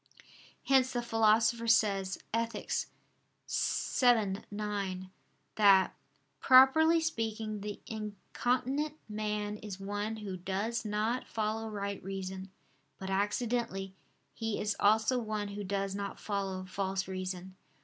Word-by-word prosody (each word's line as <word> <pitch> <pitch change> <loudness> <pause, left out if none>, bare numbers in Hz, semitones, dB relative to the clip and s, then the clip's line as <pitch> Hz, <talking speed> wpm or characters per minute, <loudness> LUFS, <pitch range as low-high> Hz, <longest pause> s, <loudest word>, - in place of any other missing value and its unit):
Hence 265 -1 +3
the 240 -1 -1
Philosopher 225 0 +3
says 195 -4 +3 0.2
(Ethic. 230 0 -2 0.8
vii, 225 -6 +2
9) 200 -3 -3 0.5
that 195 -3 +6 0.4
"properly 300 +6 +7
speaking 220 -8 -2
the 205 0 -5
incontinent 250 +7 -2
man 210 -1 -2
is 205 -3 -7
one 205 +2 -3
who 205 -4 -5
does 200 +6 -2
not 215 +4 -1
follow 220 0 -2
right 200 -1 -4
reason; 190 0 -5 0.5
but 190 0 -5
accidentally, 205 -1 -1 0.4
he 225 -2 -2
is 210 -1 0
also 220 +5 +4
one 215 -3 -3
who 205 0 -5
does 195 0 -2
not 200 0 -4
follow 195 -2 -3
false 190 0 -2
reason." 185 0 -5
210 Hz, 110 wpm, -32 LUFS, 195-225 Hz, 0.8 s, properly